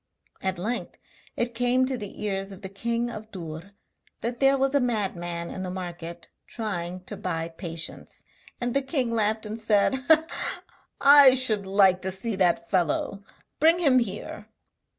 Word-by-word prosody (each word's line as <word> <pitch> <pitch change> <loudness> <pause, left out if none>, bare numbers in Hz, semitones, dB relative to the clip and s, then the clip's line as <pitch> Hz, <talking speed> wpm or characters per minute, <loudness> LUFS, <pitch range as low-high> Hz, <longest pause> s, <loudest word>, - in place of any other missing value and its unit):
At 190 -1 -1
length 220 +8 -3 0.4
it 235 0 -1
came 245 +2 +2
to 260 0 -1
the 210 -3 -7
ears 195 -1 -2
of 195 +1 -11
the 190 - -5
king 235 +4 -2
of 215 -1 -8
Dûr 170 -2 -8 0.5
that 235 +1 -3
there 275 0 +4
was 270 +1 +1
a 285 - +4
madman 175 -8 -2
in 190 - -6
the 185 - -4
market 175 -2 -7 0.2
trying 185 -5 -4
to - - -7
buy 165 -2 -3
patience. 165 -1 -6 0.4
And 245 -1 -2
the 275 - +2
king 265 -3 0
laughed 220 -1 +1
and 215 +2 -5
said: 220 +3 +2 1.0
'I 280 -2 +8
should 215 -7 +1
like 190 -2 +4
to 190 - -2
see 195 +4 -4
that 170 -2 +2
fellow, 185 +2 0 0.4
bring 325 +3 +6
him 280 -7 +4
here!' 210 -1 -5
210 Hz, 160 wpm, -26 LUFS, 185-245 Hz, 1.0 s, I